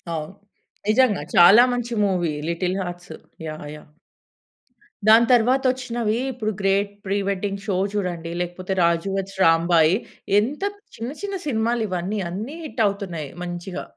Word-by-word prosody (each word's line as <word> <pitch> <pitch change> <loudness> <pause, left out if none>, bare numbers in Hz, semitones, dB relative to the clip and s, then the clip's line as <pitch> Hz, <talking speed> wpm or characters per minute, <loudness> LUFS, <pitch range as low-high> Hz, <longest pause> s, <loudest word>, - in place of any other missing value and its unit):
అవును. 155 +3 -5 0.5
నిజంగా 220 -1 +3
చాలా 190 +7 +8
మంచి 240 -1 -3
movie 175 -5 0
'little 180 +2 -1
hearts'. 175 +1 -7 0.3
Yeah! 155 -1 -7
Yeah! 150 - -14 1.2
దాని 225 +2 +7
తరువాతొచ్చినవి 245 -2 +2 0.2
ఇప్పుడు 220 -3 -3
'గ్రేట్ 200 +1 +1
ప్రి 195 +1 0
వెడ్డింగ్ 200 0 -2
షో' 195 -4 0 0.2
చూడండి, 175 -4 -3
లేకపోతే 180 +2 -4
'రాజు 170 +2 +2
వెడ్స్ 195 0 -4
రాంబాయి' 165 +1 +4 0.4
ఎంత 280 - -2 0.3
చిన్న 230 +3 -4
చిన్న 400 -1 -3
సినిమాలు 230 -2 0
ఇవన్నీ. 185 +4 -2
అన్ని 215 - -5
హిట్ 270 -6 -4
అవుతున్నాయి 185 -7 -4
మంచిగా. 175 +1 -5
195 Hz, 130 wpm, -23 LUFS, 175-230 Hz, 1.2 s, చాలా